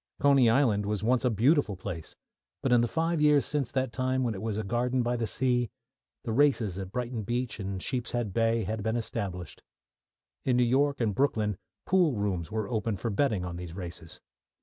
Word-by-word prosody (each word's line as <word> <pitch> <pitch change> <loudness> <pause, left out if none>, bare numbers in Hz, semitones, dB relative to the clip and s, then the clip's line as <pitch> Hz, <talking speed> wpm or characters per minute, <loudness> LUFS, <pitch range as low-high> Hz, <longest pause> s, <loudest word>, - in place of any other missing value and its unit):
Coney 140 -4 +5
Island 115 -5 +3
was 105 -1 -2
once 125 +3 +2
a 125 - +3
beautiful 120 - +2
place, 85 -3 -7 0.5
but 130 - +2
in 120 - +6
the 120 - +2
five 165 +4 0
years 150 -2 +5
since 140 -5 -1
that 130 -2 -1
time, 130 0 0
when 120 -3 0
it 95 - -7
was 110 -2 -2
a 110 - -1
garden 120 +4 0
by 120 +1 0
the 115 -2 -1
sea, 125 -2 +1 0.5
the 115 - -3
races 115 -7 +2
at 95 -1 -6
Brighton 120 0 -3
Beach 120 +2 -2
and 95 -1 -3
Sheepshead 120 -5 -2
Bay 115 +1 +2
had 110 +3 -3
been 110 +2 -1
established. 100 -6 -4 0.8
In 125 -2 +2
New 125 - +4
York 140 +3 +2
and 110 -3 +1
Brooklyn 110 -5 +1 0.3
pool 180 -6 +3
rooms 100 -4 -2
were 110 -2 -2
open 110 -1 -1
for 115 +4 -3
betting 105 -4 +1
on 85 -1 -5
these 90 -1 -7
races. 85 -3 -7
115 Hz, 195 wpm, -29 LUFS, 105-130 Hz, 0.8 s, in